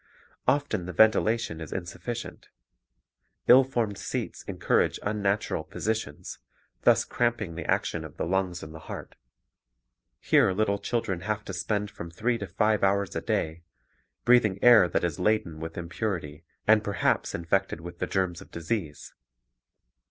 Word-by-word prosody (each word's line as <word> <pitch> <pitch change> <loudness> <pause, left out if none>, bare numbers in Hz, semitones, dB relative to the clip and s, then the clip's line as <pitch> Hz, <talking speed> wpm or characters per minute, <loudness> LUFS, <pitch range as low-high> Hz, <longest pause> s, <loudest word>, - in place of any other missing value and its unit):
Often 120 -11 +1
the 90 - -5
ventilation 110 -5 +3
is 80 - -7
insufficient. 110 +6 -6 1.0
Ill 130 +2 +9
formed 115 -6 -2
seats - - -4
encourage - - +1
unnatural 100 -4 0
positions, 95 -2 -4 0.4
thus - - +4
cramping 120 -7 -1
the 85 - -7
action - - 0
of - - -10
the - - -1
lungs 90 0 -1
and 80 - -9
the 80 - -9
heart. - - -7 1.0
Here 95 - +4
little 100 0 +1
children 100 -4 -2
have 105 +2 -3
to 95 - -6
spend 105 +3 -2
from 85 - -8
three 115 +8 -1
to 100 - -5
five 105 +3 +1
hours 100 -1 +1
a - - -1
day, 80 +2 -1 0.6
breathing 120 -6 +5
air 120 -7 +8
that - - 0
is 85 -4 -1
laden 90 -5 +1
with 80 +1 -7
impurity 85 -3 -4 0.2
and 110 0 +5
perhaps 100 -1 0
infected 85 +1 0
with 85 +1 -9
the - - -1
germs 90 -3 -1
of - - -13
disease. 85 -2 -4
100 Hz, 145 wpm, -27 LUFS, 85-110 Hz, 1.0 s, Ill